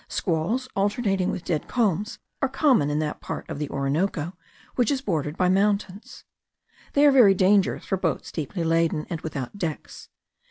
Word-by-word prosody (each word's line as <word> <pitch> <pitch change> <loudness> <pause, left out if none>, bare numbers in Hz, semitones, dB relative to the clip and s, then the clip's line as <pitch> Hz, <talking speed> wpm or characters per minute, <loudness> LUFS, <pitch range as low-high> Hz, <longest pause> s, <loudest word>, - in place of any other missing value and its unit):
Squalls 195 +10 -1
alternating 195 -2 0
with 180 - -4
dead 155 -4 -2
calms 210 -3 0 0.2
are 270 - +1
common 265 - +3
in 145 - -1
that 150 -1 -3
part - - -6
of - - -6
the 150 -2 -3
Orinoco 150 +4 -1 0.4
which 245 -3 +1
is 280 - +1
bordered 160 - -2
by 180 - +2
mountains. 200 +1 0 0.7
They 285 +1 +5
are 290 - +7
very 230 -8 +6
dangerous 190 +1 +2
for 190 - -1
boats 170 -4 -2
deeply 165 +3 -4
laden, 165 -1 +1
and 165 -2 -3
without 145 +4 -6
decks. 160 -5 -5
185 Hz, 165 wpm, -25 LUFS, 155-210 Hz, 0.7 s, are